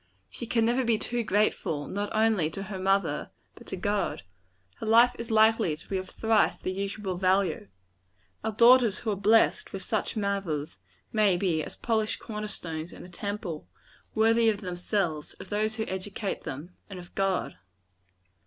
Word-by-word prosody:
She 235 - -7
can 230 -1 +2
never 245 +3 +2
be 230 -2 +2
too 240 +2 -1
grateful, 200 -8 0
not 205 +1 -3
only 215 -7 +2
to 195 +4 -6
her 195 -1 -6
mother, 195 +1 +1 0.2
but - - -15
to - - -3
God. 205 - -1 0.5
Her 225 - -6
life 235 +2 +6
is 230 +1 -5
likely 220 -6 +4
to 155 - -15
be 195 - -1
of 185 0 -7
thrice 220 -1 +2
the 185 - -3
usual 195 -1 -3
value. 185 - +1 0.8
Our 220 - -1
daughters 235 -1 +6
who 220 - -2
are - - 0
blessed 215 +3 +3
with - - -5
such - - -2
mothers, 185 - -2 0.3
may 210 -4 +4
become 175 -4 0
as - - -7
polished 220 -2 0
corner 210 -1 -5
stones 165 -5 -6
in - - -10
a - - -12
temple 195 -3 -5 0.5
worthy 225 +1 +4
of 210 -1 -1
themselves, 180 -4 -2
of - - -11
those 215 +1 0
who 220 -1 -2
educate 190 +2 -4
them, 150 +7 -6 0.2
and 195 - -7
of 175 -1 -11
God. 195 -1 -1
200 Hz, 170 wpm, -28 LUFS, 185-220 Hz, 0.8 s, life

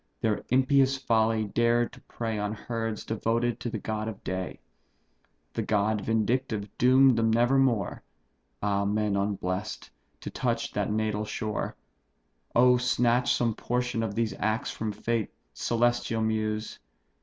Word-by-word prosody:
their 110 -2 0
impious 135 +1 +3
folly 110 -3 +2
dared 120 +3 +1
to - - -14
prey 115 -2 -4
On 105 +1 -2
herds 115 -1 -4
devoted 115 +1 0
to 120 - -3
the - - -3
god 110 0 -3
of 110 -3 -7
day; 95 0 -4 0.9
The - - -1
god 105 0 +1
vindictive 110 -2 -1
doom'd 130 +1 +6
them 115 0 +2
never 120 +4 +3
more 115 -8 +1 0.6
(Ah, 100 -1 +1
men 105 0 0
unbless'd!) 100 0 -2 0.3
to - - -6
touch - - -1
that - - -1
natal 110 0 0
shore. 105 0 -3 0.8
Oh, 125 +1 +6
snatch 125 0 +2
some 115 -2 +1
portion 125 0 -1
of 110 -3 -3
these 115 -3 0
acts 110 +2 0
from 110 -1 -3
fate, 115 0 -2 0.2
Celestial 120 -1 +1
Muse! 110 0 -2
110 Hz, 140 wpm, -28 LUFS, 105-120 Hz, 0.9 s, doom'd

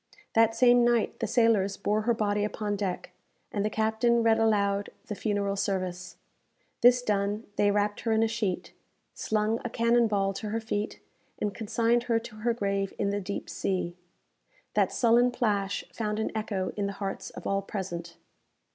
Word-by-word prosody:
That 225 0 +4
same 245 -1 +5
night 240 -2 +1
the 225 - -1
sailors 220 -4 +2
bore 210 +1 0
her - - +5
body 205 -1 0
upon 210 0 -2
deck, 195 -3 -3 0.4
and 205 - -1
the 210 - +1
captain 220 +2 +2
read 225 -1 +4
aloud 205 -2 +2 0.2
the - - -4
funeral 205 -1 -1
service. 185 -3 -3 0.7
This 245 0 +6
done, 205 0 0
they 205 - +3
wrapt 205 0 +1
her 230 - -1
in 220 0 +3
a - - +3
sheet, 215 -5 -2 0.4
slung 215 +1 0
a 240 - -3
cannon 235 0 +3
ball 195 -2 0
to 210 +2 -5
her 225 +2 -1
feet, 215 -2 -3 0.4
and 205 -1 -2
consigned 230 +2 +1
her 230 - +4
to 225 -1 -7
her 235 +2 0
grave 200 -3 -1
in 200 -1 0
the 205 0 -1
deep 200 +1 -5
sea. 180 -2 -2 0.8
That - - +2
sullen 240 0 +4
plash 205 -5 -1
found 210 -2 -2
an 220 - -1
echo 205 -4 -2
in 205 -1 -1
the 200 - -4
hearts 195 -1 -4
of - - -10
all 195 0 +1
present. 175 -4 -6
210 Hz, 175 wpm, -28 LUFS, 200-225 Hz, 0.8 s, This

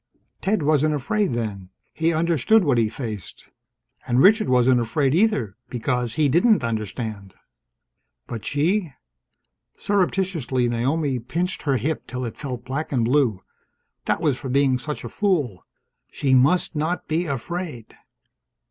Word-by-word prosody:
Ted 195 -4 0
wasn't 155 +1 +2
afraid, 200 - 0
then. 100 -5 -4 0.2
He 165 +1 +1
understood 170 - +3
what 135 -7 +2
he 110 -2 +2
faced. 110 - -7 0.6
And 120 +1 +2
Richard 215 - +5
wasn't 125 0 +4
afraid, 135 +4 +1
either, 160 - +1
because 125 -1 -2
he 155 -2 +3
didn't 180 - +3
understand. 110 -3 -4 0.9
But 115 -3 -6
she? 165 +3 0 0.8
Surreptitiously 180 -10 0
Naomi 130 +3 0
pinched 170 +10 -3
her 140 -3 +1
hip 155 +4 -3
till 125 0 -4
it 115 - -6
felt 125 -4 -5
black 140 +5 -4
and 120 -5 +1
blue. 120 -7 +1 0.6
That - - 0
was 145 -6 +1
for 135 - -6
being 135 -1 +2
such 150 +4 -5
a - - -5
fool. 150 - -1 0.4
She 135 -2 0
must 145 +7 +3
not 160 +4 -2
be 165 +3 0
afraid! 145 -2 -5
140 Hz, 140 wpm, -23 LUFS, 120-165 Hz, 0.9 s, Richard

